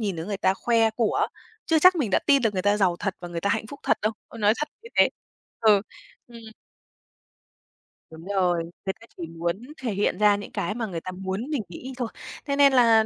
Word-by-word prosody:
nhìn 200 -5 -2
thấy 160 - -5
người 200 -1 -2
ta 190 - +2
khoe 225 +1 +2
của, 220 0 +1 0.4
chưa 325 -2 +4
chắc 365 +3 +7
mình 255 - 0
đã - - +4
tin 280 -2 +5
được 225 -3 +2
người 185 -2 -2
ta 205 +1 +3
giàu 185 -4 +2
thật 195 -2 -2
và 175 - -7
người 170 -1 -4
ta 200 - 0
hạnh 220 +1 0
phúc 280 +6 -10
thật - - +2
đâu, 215 +1 +1 0.2
ờ, 230 - -11
nói 210 -1 +4
thật 300 - -3
như 460 - -11
thế. - - +6 0.5
Ừ, 215 -3 +5 0.5
ừm. 235 -1 -12 1.7
Đúng 160 +1 -12
rồi, 180 -4 +1
người 180 +3 -6
ta 230 - -15
chỉ 170 - -5
muốn 170 +5 -3 0.2
thể 240 -4 -1
hiện 195 -2 0
ra 210 -1 +5
những 205 - -9
cái 205 +5 -2
mà 230 -2 -3
người 175 -4 -5
ta 185 - -6
muốn 190 +8 -4
mình 285 -8 -1
nghĩ 255 +10 -8
thôi. 245 -2 -2 0.4
Thế 280 -1 -1
nên 280 -1 +6
là 230 -3 +6
210 Hz, 235 wpm, -25 LUFS, 185-235 Hz, 1.7 s, chắc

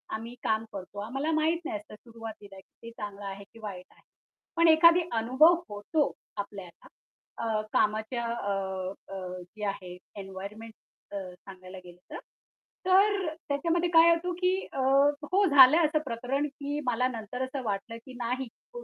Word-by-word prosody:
आम्ही 230 +2 -7
काम 220 +1 +1
करतो, 195 +1 -7
आम्हाला 270 +9 -2
माहित 320 +2 +2
नाही 340 -3 -2
असंत 305 -9 -13
सुरुवातीला 220 -4 -10
ते 230 +4 -14
चांगलं 205 -2 -7
आहे, 195 0 -6
की 225 +3 -18
वाईट 195 -4 -7
आहे. - - -24 0.5
पण 335 0 +5
एखादा 335 +2 +6
अनुभव 305 +10 +5
होतो 205 +9 0 0.3
आपल्याला 200 -3 -7 0.5
अ, 220 -2 0
कामाच्या 220 +3 +1
अ, 230 -3 -2 0.6
अ, - - -4 0.2
जे 210 +4 -8
आहे 185 -2 -4 0.2
एन्व्हायर्नमेंट 200 +4 -8 0.4
अ, 205 - -6 0.2
सांगायला 185 0 -12
गेलं 175 0 -13
तर, - - -5 0.7
तर 390 0 +4 0.2
त्याच्यामध्ये 340 +4 +1
काय 335 0 +7
होतं 350 +2 0
की 365 0 +3 0.2
अ - - -4 0.5
हो 400 +2 +4
झालंय 285 0 +8
असं 305 0 +1
प्रकरण 255 +4 -1
की 285 +1 -5
मला 250 +1 +2
नंतर 235 +1 -6
असं 265 +1 -4
वाटलं 215 +2 -3
की 260 - -11
नाही, 250 +2 -2 0.3
तो 485 0 -7
235 Hz, 155 wpm, -29 LUFS, 205-315 Hz, 0.7 s, झालंय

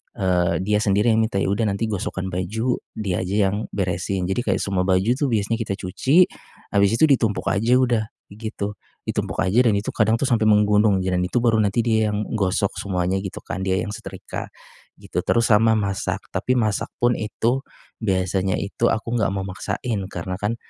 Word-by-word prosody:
eee, 90 -2 +1
dia 105 +1 +2
sendiri 105 +2 +2
yang 110 - +3
minta, 110 -2 -1
ya - - 0
udah 110 +2 +1
nanti 100 +2 -1
gosokan 95 -1 -3
baju, 110 +8 -1 0.2
dia 100 -5 -2
aja 95 +1 +1
yang, 105 +2 -3
beresin. 95 0 -1
Jadi 95 +6 -1
kayak - - +2
semua 95 -2 0
baju 95 0 +3
itu 140 +3 +1
biasanya 115 -1 0
kita 105 -4 -2
cuci, 130 - +3 0.5
habis 100 +1 +3
itu 115 - +1
ditumpuk 115 -7 +2
aja 115 +5 +2
udah, 120 -3 +2 0.3
gitu. 105 -1 -5 0.3
Ditumpuk - - -2
aja 95 +5 +2
dan 110 - +3
itu 100 +1 -2
kadang 110 - +2
itu 115 - -2
sampai 115 -5 +2
menggunung 105 -2 +4
dan 90 -1 0
itu 120 +6 0
baru 115 -2 +3
nanti 105 +2 +2
dia 110 -2 +2
yang 105 0 -1 0.2
gosok 95 0 +1
semuanya 95 -1 -1
gitu 95 -1 -7
kan, - - -5
dia 95 0 0
yang 105 - -5
setrika, 105 - -7 0.5
gitu, - - -4
terus 115 -1 +2
sama 110 +1 +5
masak. 100 -2 -1
Tapi 125 - 0
masak 110 -5 0 0.2
pun 120 0 +5
itu, 115 +4 0 0.4
biasanya 95 -2 0
itu 100 +4 -2
aku 115 +2 -1
enggak 100 - +2
mau 100 - -1
maksain. 100 +4 -3
Karena 90 0 -5
kan, 105 +3 -1
105 Hz, 190 wpm, -22 LUFS, 95-115 Hz, 0.5 s, sama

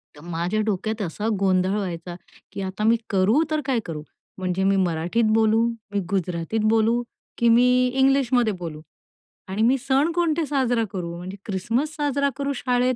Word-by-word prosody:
तर 145 - -14
माझ्या 175 +6 -1
डोक्यात 215 +2 -2
असा 205 +4 -3
गोंधळ 185 0 +2
व्हायचा, 175 -3 -4 0.4
की - - -6
आता 190 +2 -4
मी 225 +2 +5
करू 210 +10 +3
तर 310 - +1
काय 260 -4 +1
करू. 155 -3 -5 0.4
म्हणजे 185 0 -1
मी 195 0 +3
मराठीत 180 +4 +1
बोलू, 225 +1 +3 0.3
मी 200 - 0
गुजरातीत 180 +2 -1
बोलू, 225 +2 +3 0.4
की 235 0 +3
मी 240 +2 +6 0.3
इंग्लिशमध्ये 265 -4 +3
बोलू. 155 -3 -6 0.7
आणि 190 +3 -3
मी 260 +4 +4
सण 275 +5 +1
कोणते 335 -2 +1
साजरा 255 -5 +1
करू 170 -3 -4
म्हणजे 185 +3 -7
क्रिसमस 230 +10 -1
साजरा 280 -1 +1
करू 280 0 -1
शाळेत 250 0 +1
220 Hz, 160 wpm, -23 LUFS, 185-255 Hz, 0.7 s, मी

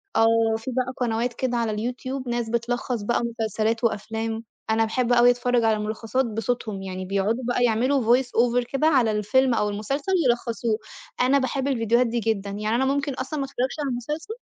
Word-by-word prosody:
آه، 225 0 +4
في 225 +4 -6
بقى 255 +1 -1
قنوات 240 0 -1
كده 245 0 -1
على 230 -2 0 0.2
الYouTube 255 +1 -6
ناس 240 -1 -2
بتلخّص 240 0 -1
بقى 220 +4 0 0.2
مسلسلات 220 +1 0
وأفلام، 225 +1 -2 0.3
أنا 225 0 +3
باحب 245 +2 0
أوي 240 0 +6
أتفرّج 245 -1 +1
على 220 -1 +2
ملخّصات 220 +4 -1
بصوتهم 225 -2 -3
يعني 185 -1 -5
بيقعدوا 200 +6 0
بقى 245 0 +1
يعملوا 240 +1 +3
voice 265 - -2
over 245 0 +2
كده 275 +3 +2
على 255 -8 +4
الفيلم 240 +5 +2
أو 210 -2 +1
المسلسل 275 - -3 0.2
يلخّصوه، 235 -2 0 0.4
أنا 265 +3 +4
باحب 265 +1 -1
الفيديوهات 235 -2 +2
دي 235 +1 -1
جدًا 210 -3 -1
يعني 210 +2 -2
أنا 260 +3 +2
ممكن 280 +1 0
أصلًا 270 +4 -4
ما 275 - -1
أتفرّجش 265 +2 -3
على 285 -2 -1
المسلسل 300 - -4
235 Hz, 185 wpm, -24 LUFS, 220-255 Hz, 0.4 s, أوي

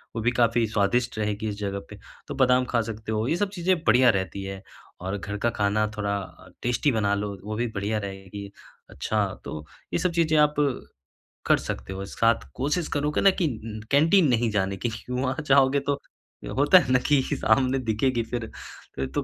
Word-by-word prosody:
वो 115 - -2
भी 120 +2 +2
काफ़ी 115 0 +3
स्वादिष्ट 115 +3 0
रहेगी 105 +1 -1
इस 100 - -5
जगह 100 -1 -3
पे, - - -10 0.3
तो - - -5
बादाम 125 0 +4
खा 120 -2 +2
सकते 110 0 -6
हो, 110 +1 0
ये 165 - +1
सब 205 0 0
चीज़ें 185 -1 +1
बढ़िया 125 +2 +6
रहती 95 -1 -1
है 95 0 -6 0.4
और 95 +2 -3
घर 100 +1 -5
का 120 +3 +1
खाना 105 +1 +2
थोड़ा 100 -1 -1
अ, 95 - -12
टेस्टी 125 +4 +1
बना 105 -4 +1
लो 100 -1 -4
वो 105 +1 -4
भी 120 +2 -1
बढ़िया 105 +2 -1
रहेगी। 100 0 -7 0.4
अच्छा - - -1 0.2
तो 75 -1 -6 0.3
ये - - +1
सब 180 0 +1
चीज़ें 160 -2 +2
आप 150 0 +4 0.9
कर - - +5
सकते - - -5
हो, 95 +1 -5
साथ 115 - +1
कोशिश 150 +5 -1
करो 150 +1 0
कि - - 0
ना 195 - +7
कि 165 - +3 0.3
उम 110 - -7
कैंटीन 160 +5 +5
नहीं 120 -1 +2
जाने 95 -1 0
की, - - +2 0.2
वहाँ 130 +1 -1
जाओगे 135 0 +5
तो 140 - +2 0.6
होता 145 +6 +7
है 130 - -2
ना 125 - +5
कि 145 -2 +4
सामने 130 +4 +2
दिखेगी 115 +1 0
फिर 120 -2 -2 0.5
फिर 65 - -2
तो - - 0
115 Hz, 200 wpm, -25 LUFS, 100-135 Hz, 0.9 s, ना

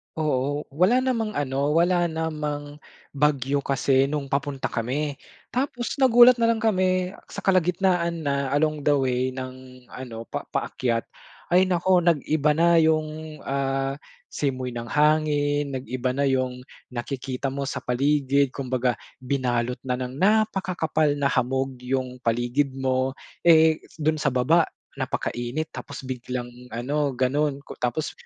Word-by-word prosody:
Oo. 145 -1 0
Wala 195 - +3
namang 230 -5 -1
ano, 140 +1 0
wala 175 +1 +3
namang 150 -2 -4 0.3
bagyo 140 -1 +1
kasi 135 -1 +2
no'ng 140 -1 -3
papunta 140 0 -1
kami 140 +5 -2 0.3
tapos 250 -1 -2
nagulat 250 -2 +7
na 230 - +2
lang 225 - -5
kami 185 -4 +1 0.2
sa - - -7
kalagitnaan 180 -2 +1
na 140 -1 0
along 155 -1 0
the 145 - +5
way 130 -2 0
ng 130 0 -8
ano 120 -3 -7
pa - - -4
paakyat 115 -2 -1 0.5
ay 180 +2 +5
naku 185 0 +2
nag-iba 155 -2 +2
na 170 +1 +4
'yung, 155 -1 0
ah, 135 0 -1 0.3
simoy 130 -3 -2
ng 120 0 -4
hangin, 145 -1 +2
nag-iba 130 -1 -2
na 140 +1 +1
'yung 130 -1 0 0.3
nakikita 130 +2 -4
mo 140 +1 -3
sa 135 - -3
paligid, 140 +1 +1
kumbaga 130 -2 -1 0.3
binalot 125 -2 -1
na 125 - +1
ng 125 0 -5
napakakapal 185 -7 +2
na 140 -2 +1
hamog 130 +1 -1
'yung 125 0 -3
paligid 120 +4 0
mo, 130 0 0 0.3
eh, 160 -1 +6
s - - -21
do'n 155 0 0
sa 145 - 0
baba 135 +6 +3 0.3
napakainit 120 +6 -3
tapos 140 - -8
biglang 125 -1 -5 0.2
ano, 140 +4 -1
gano'n 140 +3 0
ku - - -10
tapos 125 +6 -1
140 Hz, 135 wpm, -25 LUFS, 130-160 Hz, 0.5 s, nagulat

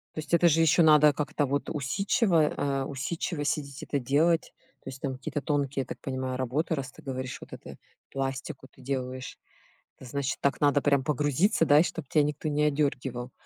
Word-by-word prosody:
То - - -4
есть, 155 +2 -7
это 170 0 +5
же 165 0 +4
ещё 165 +2 +4
надо 150 -2 +7
как-то, 150 +1 -1
вот 140 +1 -2
усидчиво, 170 - +1
э, 140 -1 -1
усидчиво 145 +3 -3
сидеть 140 -2 -3
это 140 - -2
делать. 155 +6 +1 0.3
То - - -16
есть, 130 0 -10
там 135 -2 -2
какие-то 140 +3 -4
тонкие, 140 -2 -1
я - - -5
так - - -8
понимаю, 130 -1 -3
работы, 130 +6 -1
раз 135 -3 -3
ты - - -15
говоришь, 130 -1 -5
вот - - -12
это, - - -10 0.3
пластику 135 +1 -4
ты - - -19
делаешь. 130 0 -4 0.6
Это 130 - -11
значит 140 +1 -2
так 140 - 0
надо 145 0 +4
прям 140 -2 +3
погрузиться, 150 - +1
да, 145 0 +6
и - - +6
чтобы 165 -3 -4
тебя 150 - +3
никто 150 +1 -2
не 150 0 0
одёргивал. 135 -4 -1
145 Hz, 195 wpm, -28 LUFS, 135-150 Hz, 0.6 s, надо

